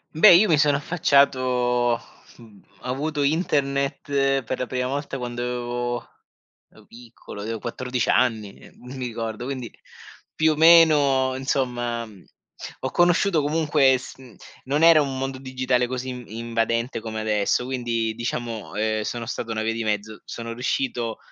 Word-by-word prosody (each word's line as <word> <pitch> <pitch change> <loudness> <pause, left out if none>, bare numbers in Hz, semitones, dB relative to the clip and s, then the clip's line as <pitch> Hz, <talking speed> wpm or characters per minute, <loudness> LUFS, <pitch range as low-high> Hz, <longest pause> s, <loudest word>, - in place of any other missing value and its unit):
Beh, 180 +4 +8
io 190 +5 +6
mi 155 - +4
sono 145 -1 +3
affacciato 130 -7 +2 0.4
uhm, 110 -4 -17 0.2
avuto 145 +4 -3
internet 140 -2 0
per 125 +1 -4
la 125 - -2
prima 125 0 -2
volta 140 0 -4
quando 120 -1 -4
avevo 120 -1 -3 0.6
ero - - -19
piccolo, 115 -3 -12
avevo 110 +1 -4
14 125 +1 -3
anni, 110 -5 +1
ehm, - - -17 0.2
mi 130 - -4
ricordo, 115 0 -5
quindi 130 -3 -5 0.6
più 155 0 +2
o - - -5
meno, 150 -5 +5
insomma. 120 -3 -2 0.7
Ho 130 - -2
conosciuto 175 -1 +3
comunque 150 -3 +3
s 130 - -11
mhmm, 130 -5 -15 0.3
non 140 +4 0
era 165 -1 +8
un 135 -2 -3
mondo 135 0 -3
digitale 130 -1 -1
così 130 +1 -4 0.3
invadente 115 +1 -1
come 110 0 -5
adesso, 105 +2 0
quindi 120 -3 -2
diciamo, 120 -2 -5
ehm, 110 0 0
sono 115 +1 -4
stato 115 -1 -4
una 110 -1 -2
via 110 +1 -1
di 115 0 -3
mezzo. 105 0 -3
Sono 115 -1 -6
riuscito 120 -1 -2
125 Hz, 145 wpm, -23 LUFS, 115-140 Hz, 0.7 s, Beh